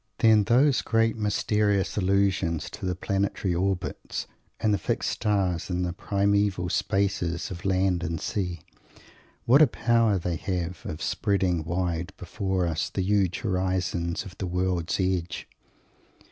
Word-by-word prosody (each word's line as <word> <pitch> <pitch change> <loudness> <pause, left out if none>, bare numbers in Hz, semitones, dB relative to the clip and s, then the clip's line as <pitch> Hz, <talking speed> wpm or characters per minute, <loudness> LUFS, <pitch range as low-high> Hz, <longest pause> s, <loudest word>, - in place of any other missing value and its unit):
Then 110 -2 +5
those 130 +5 +4
great 115 0 +2
mysterious 105 -2 +1
allusions 95 -4 +1
to 100 - -5
the 90 - -1
planetary 95 0 -1
orbits 95 +1 -2 0.3
and 110 -1 +2
the 100 - +1
fixed - - -1
stars 95 -5 0
and 90 0 -1
the 90 - -2
primeval 100 -1 +1
spaces 100 -4 0
of 90 0 -7
land 95 -2 +2
and 80 -1 -2
sea; 90 -5 -3 0.8
what 135 +6 +6
a 155 - +8
power 115 -4 +2
they 85 -2 -2
have 90 -2 -3
of 75 +1 -5
spreading 95 -5 0
wide 85 +2 -2
before 95 +1 -2
us 80 -2 -1
the 95 - -2
huge 95 -2 +1
horizons 95 -4 -1
of 95 - -10
the 95 - -2
world's 90 -1 -1
edge! 90 -3 -1
95 Hz, 140 wpm, -26 LUFS, 90-100 Hz, 0.8 s, a